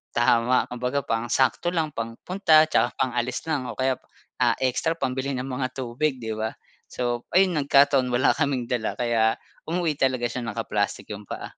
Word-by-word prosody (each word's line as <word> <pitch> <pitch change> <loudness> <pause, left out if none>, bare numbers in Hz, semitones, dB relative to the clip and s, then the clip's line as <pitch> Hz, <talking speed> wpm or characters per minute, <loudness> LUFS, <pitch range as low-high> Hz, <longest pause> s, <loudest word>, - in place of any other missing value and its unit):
Tama. 120 +1 +3
Kumbaga 125 +3 -1
pang-sakto 120 +7 +1
lang, 160 -3 0
pang-punta 155 - +3
tsaka - - +2
pang-alis 125 -1 -1
lang 140 -5 -1
o - - -9
kaya 130 -1 +1 0.4
ah, - - +4
ekstra 130 +5 +1
pambili 135 -1 -2
ng 125 - -3
mga 130 -1 -3
tubig, 130 +3 -1
'di 110 -1 -4
ba. 110 0 -2 0.4
So 120 -1 -2
ayun, 185 -3 +4
nagkataon 140 -2 +4
wala 120 +2 +4
kaming 140 -5 0
dala 120 -3 -1
kaya 115 -2 +2 0.3
umuwi 165 -3 -1
talaga 130 -2 +1
siya 125 -1 -4
naka-plastik 105 -2 -2
yung 105 0 -7
paa. - - -6
130 Hz, 160 wpm, -25 LUFS, 120-140 Hz, 0.4 s, ah